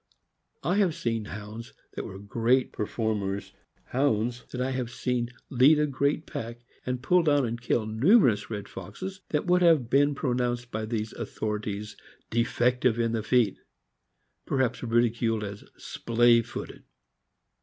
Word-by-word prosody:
I 175 +7 +1
have 190 -6 +2
seen 115 -2 -2
Hounds 105 +4 -8 0.2
that - - -5
were 95 - -8
great 115 +6 +1
performers 105 -2 -2 0.2
— - - -39
Hounds 120 -2 +1
that 125 - -6
I 130 +1 0
have 130 -2 -2
seen 125 -1 -2 0.2
lead 135 +4 +6
a 150 - +3
great 140 +2 0
pack, 120 +1 -7 0.2
and 125 0 -2
pull 180 +5 +4
down 145 -4 +3
and 115 0 -4
kill 115 -2 0
numerous 115 - +4
red 105 -3 -5
foxes— 185 - -8
that 150 - 0
would 180 0 +3
have 155 -9 +4
been 145 +1 +4
pronounced 125 -3 -1
by 110 0 -3
these 110 -1 -3
authorities 105 -1 -4 0.4
defective 120 +1 +2
in 115 -1 +1
the 115 -1 -1
feet; 115 -2 +2 0.9
perhaps 130 -3 0
ridiculed 115 -2 +1
as 100 0 -7
" - - -35
splay 120 0 +3
footed. - - -8
120 Hz, 150 wpm, -27 LUFS, 110-130 Hz, 0.9 s, lead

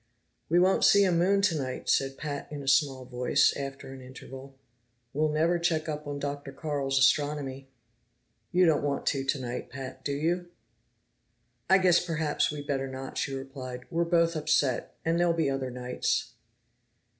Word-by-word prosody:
"We 170 - +3
won't 185 +2 +4
see 200 - +6
a 190 - +3
moon 190 +4 +2
tonight," 145 -9 -1
said 135 0 +1
Pat 145 -2 -5
in 145 -1 -6
a - - -10
small 135 -2 +2
voice, 125 0 +2
after 135 -1 -6
an 135 - -10
interval. 130 +1 -11 0.6
"We'll 155 +2 +1
never 165 +3 +2
check 165 -2 0
up 150 -1 -4
on 145 0 -4
Dr. 140 0 -5
Carl's 140 -1 -2
astronomy." 135 -1 +1 0.8
"You 180 +1 +4
don't 160 -2 +3
want 140 -1 -2
to 135 -1 -2
tonight, 130 -3 -3
Pat, 130 0 -8
do 140 - -2
you?" 170 +5 -1 1.2
"I 190 - +7
guess 180 -2 +4
perhaps 160 -3 0
we'd 145 -1 -5
better 135 -1 -1
not," 130 0 -6
she 135 - -2
replied. 130 -2 -7
"We're 170 0 +1
both 170 -1 +2
upset, 150 -4 0
and 165 +1 +1
there'll 175 -1 +3
be 160 -4 +1
other 135 -1 -2
nights." 125 0 -2
145 Hz, 165 wpm, -28 LUFS, 135-165 Hz, 1.2 s, I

